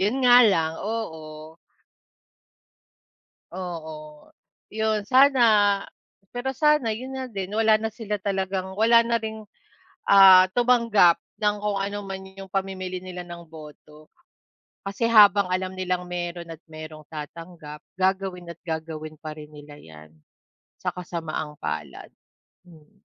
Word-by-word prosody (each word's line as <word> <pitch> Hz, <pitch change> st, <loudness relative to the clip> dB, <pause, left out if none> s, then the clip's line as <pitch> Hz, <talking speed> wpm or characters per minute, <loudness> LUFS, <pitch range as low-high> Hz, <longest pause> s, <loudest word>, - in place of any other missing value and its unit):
Yon 205 Hz, +6 st, +1 dB
nga 245 Hz, -1 st, +7 dB
lang, 160 Hz, -3 st, 0 dB, 0.2 s
oo. 160 Hz, -8 st, -7 dB, 2.3 s
Oo, 155 Hz, -4 st, -8 dB, 0.5 s
'yon. 220 Hz, -2 st, -1 dB
Sana, 230 Hz, -7 st, +4 dB, 0.5 s
pero 245 Hz, +2 st, -2 dB
sana 295 Hz, -3 st, +2 dB
'yon 255 Hz, +5 st, -5 dB
nga 260 Hz, 0 st, -4 dB
din 195 Hz, 0 st, -5 dB
wala 220 Hz, -1 st, +4 dB
na 220 Hz, 0 st, -3 dB
sila 210 Hz, -3 st, -4 dB
talagang, 190 Hz, -1 st, -3 dB
wala 230 Hz, +2 st, +4 dB
na 235 Hz, -1 st, 0 dB
ring, 220 Hz, -1 st, -6 dB, 0.6 s
ah, 190 Hz, -2 st, +8 dB
tumanggap 230 Hz, -8 st, +4 dB, 0.2 s
ng 210 Hz, -1 st, +1 dB
kung 205 Hz, -1 st, -1 dB
ano 200 Hz, +1 st, -3 dB
man 195 Hz, -1 st, -7 dB
yung 195 Hz, -1 st, -10 dB
pamimili 190 Hz, -1 st, -3 dB
nila 180 Hz, -1 st, -8 dB
ng 170 Hz, -1 st, -10 dB
boto. 155 Hz, -1 st, -14 dB, 0.8 s
Kasi, 200 Hz, +4 st, -4 dB
habang 205 Hz, -3 st, +6 dB
alam 185 Hz, 0 st, -2 dB
nilang 180 Hz, -1 st, -3 dB
meron 175 Hz, -1 st, -5 dB
at 165 Hz, 0 st, -11 dB
merong 155 Hz, 0 st, -10 dB
tatanggap, 155 Hz, 0 st, -9 dB, 0.2 s
gagawin 190 Hz, -2 st, -1 dB
at 170 Hz, -, -8 dB
gagawin 160 Hz, -2 st, -6 dB
pa 155 Hz, -2 st, -7 dB
rin 150 Hz, 0 st, -12 dB
nila 145 Hz, 0 st, -13 dB
'yan, 80 Hz, -, -15 dB, 0.6 s
sa -, -, -3 dB
kasamaang 165 Hz, -4 st, -5 dB
palad. 75 Hz, -3 st, -6 dB, 0.5 s
Hmm. 165 Hz, +4 st, -20 dB
185 Hz, 125 wpm, -24 LUFS, 160-210 Hz, 2.3 s, ah